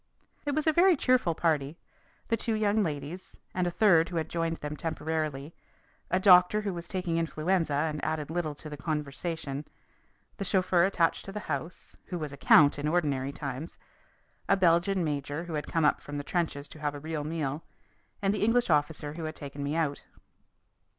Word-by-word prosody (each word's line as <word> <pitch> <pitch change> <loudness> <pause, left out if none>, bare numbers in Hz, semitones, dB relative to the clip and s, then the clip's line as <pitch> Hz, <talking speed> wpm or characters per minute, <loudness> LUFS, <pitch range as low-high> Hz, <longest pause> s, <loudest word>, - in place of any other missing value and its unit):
It 285 - 0
was 310 - 0
a 315 - +4
very 355 +2 +6
cheerful 255 -11 +2
party 155 -2 0 0.5
the 230 - +3
two 225 0 -1
young 215 0 +2
ladies, 155 +1 -5 0.2
and 180 -1 0
a - - +2
third 170 -4 +4
who 180 - -6
had 160 -1 -1
joined 165 -1 -1
them 150 0 -5
temporarily, 155 -2 -3 0.6
a 185 - +2
doctor 185 +2 +6
who 200 -2 -2
was 170 -1 -7
taking 175 -3 -1
influenza 165 -1 0
and 150 +1 -1
added 155 -1 -2
little 160 -3 -2
to 155 - -10
the 150 -1 -7
conversation, 150 0 -3 0.7
the - - -3
chauffeur 185 -2 +3
attached 175 -4 +1
to 195 - -7
the 210 +1 -5
house, 160 +1 -5
who 180 - -4
was 150 -4 -5
a - - -9
count 145 0 +6
in 145 - -1
ordinary 145 -5 0
times, 140 +2 -6 0.7
a 195 - +5
Belgian 180 +1 +3
major 145 0 -2
who 175 -2 -7
had 150 -1 -3
come 165 -2 +1
up 150 - +3
from 145 0 -6
the 145 - -3
trenches 150 -4 -2
to 155 - -12
have 145 -1 -2
a - - -6
real 155 0 -4
meal, 150 -1 -3 0.6
and 195 0 +3
the 210 - -1
English 230 -2 +3
officer 150 0 0
who 160 0 -5
had 155 0 -5
taken 140 -1 -7
me 145 +2 -2
out. 155 -4 -1
160 Hz, 190 wpm, -29 LUFS, 150-180 Hz, 0.7 s, very